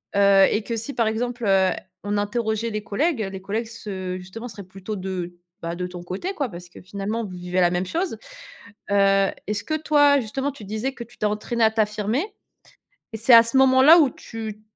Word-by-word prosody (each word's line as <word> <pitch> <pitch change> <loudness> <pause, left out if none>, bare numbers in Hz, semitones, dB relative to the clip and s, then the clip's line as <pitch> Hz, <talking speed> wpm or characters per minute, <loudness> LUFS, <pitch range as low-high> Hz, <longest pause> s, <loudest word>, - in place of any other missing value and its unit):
heu 200 -1 +6
et 215 - 0
que 230 - -3
si, 230 +5 -5
par 230 -2 +1
exemple, 240 +2 -2
heu, 190 -1 +4 0.3
on 205 0 -1
interrogeait 220 +2 -1
les 215 -1 -4
collègues, 255 +6 0
les 190 - -7
collègues 215 +4 -3
se 190 -5 -6
justement, 190 +6 -8
seraient 205 -3 -9
plutôt 195 +3 -7
de 185 -2 -5 0.3
bah, 170 0 -4
de 180 +1 -3
ton 175 -1 -9
côté, 195 - -4
quoi, 285 -8 -2
parce 175 -4 -10
que, - - -14
finalement, 200 +4 -4
vous 190 - -8
vivez 180 +1 -2
la 175 - +5
même 175 +1 -1
chose. 340 - -2 0.7
Heu, 195 -1 +4 0.2
est-ce 210 0 -2
que, 310 - -2
toi, 290 -2 +4
justement, 270 +5 -3
tu 265 -5 -13
disais 220 +6 -3
que 235 - -7
tu 240 +2 -20
t'es - - -2
entraînée 215 +3 -1
à 220 - +4
t'affirmer 215 - 0 0.9
et - - -4
c'est 235 +2 +5
à 230 - +10
ce 230 +3 -2
moment-là, 265 +5 +7
où 285 -4 +4
tu 220 -3 -8
215 Hz, 205 wpm, -23 LUFS, 195-240 Hz, 0.9 s, à